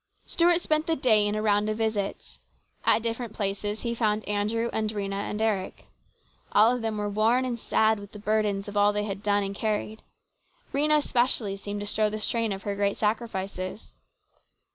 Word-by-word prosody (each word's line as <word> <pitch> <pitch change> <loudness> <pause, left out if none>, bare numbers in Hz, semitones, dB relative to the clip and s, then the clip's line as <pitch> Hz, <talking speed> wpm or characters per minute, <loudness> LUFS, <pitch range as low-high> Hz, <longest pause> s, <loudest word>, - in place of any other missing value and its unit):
Stuart 345 0 +3
spent 310 -1 +1
the 325 - +2
day 220 -7 +4
in 205 - -1
a 215 - -2
round 210 0 +2
of 215 - -2
visits. 220 -3 -3 0.4
At 225 - +3
different 230 -1 -3
places 205 +1 -2
he 235 -1 -2
found 215 -2 0
Andrew 210 +3 0
and 215 -1 0
Rhena 200 -2 -2 0.2
and 210 - -4
Eric. 210 -4 -1 0.7
All 220 +4 +6
of 250 - -4
them 220 -1 -2
were 210 0 -1
worn 220 +5 +2
and 240 -2 -3
sad 220 0 +2
with 200 0 -11
the 210 - -10
burdens 210 -1 0
of 205 - -7
all 205 0 +4
they 210 0 -1
had 200 -1 -5
done 205 -1 +2
and 195 0 -3
carried. 215 +1 -2 0.7
Rhena, 300 +2 +3
especially, 240 -7 +1
seemed 205 +1 -5
to - - -4
show 215 +1 +2
the 215 - -4
strain 225 0 0
of 195 0 -5
her 200 -1 -2
great 200 0 0
sacrifices. 205 -3 -3
215 Hz, 190 wpm, -27 LUFS, 205-230 Hz, 0.7 s, All